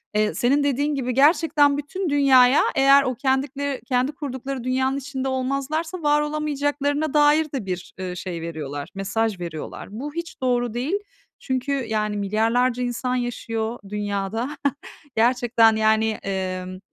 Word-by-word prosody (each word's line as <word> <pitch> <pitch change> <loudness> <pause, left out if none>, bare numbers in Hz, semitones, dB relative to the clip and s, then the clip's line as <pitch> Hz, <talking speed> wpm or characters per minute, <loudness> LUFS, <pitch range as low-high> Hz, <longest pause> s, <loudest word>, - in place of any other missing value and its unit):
Eee, 210 0 +2
senin 280 +4 +2
dediğin 285 +1 0
gibi, 255 -2 -2
gerçekten 290 0 +4
bütün 340 +5 -3
dünyaya, 270 -2 +5
eğer 275 +1 +6
o 255 -2 -1
kendikle 270 +1 -1
kendi 255 +3 +1
kurdukları 270 -3 -5
dünyanın 260 +1 0
içinde 270 -1 -4
olmazlarsa 275 +7 -2
var 295 0 +3
olamayacaklarına 290 0 -1
dair 300 +1 +5
de 245 -8 -3
bir, 180 -1 -5
ııı, 180 -1 -4
şey 175 -3 -5
veriyorlar, 145 -4 -5
mesaj 210 +1 -1
veriyorlar. 165 -3 -6
Bu 280 +7 -6
hiç 335 -4 -6
doğru 245 -2 0
değil. 265 +11 -1 0.4
Çünkü, 260 +1 -2 0.2
yani, 210 -1 -1
milyarlarca 230 +5 +1
insan 250 +1 -2
yaşıyor 230 -1 -3
dünyada. 210 +5 -3 0.6
Gerçekten, 235 -1 +4
yani, 220 0 +3
emm, 185 -1 -3
255 Hz, 135 wpm, -23 LUFS, 220-285 Hz, 0.6 s, eğer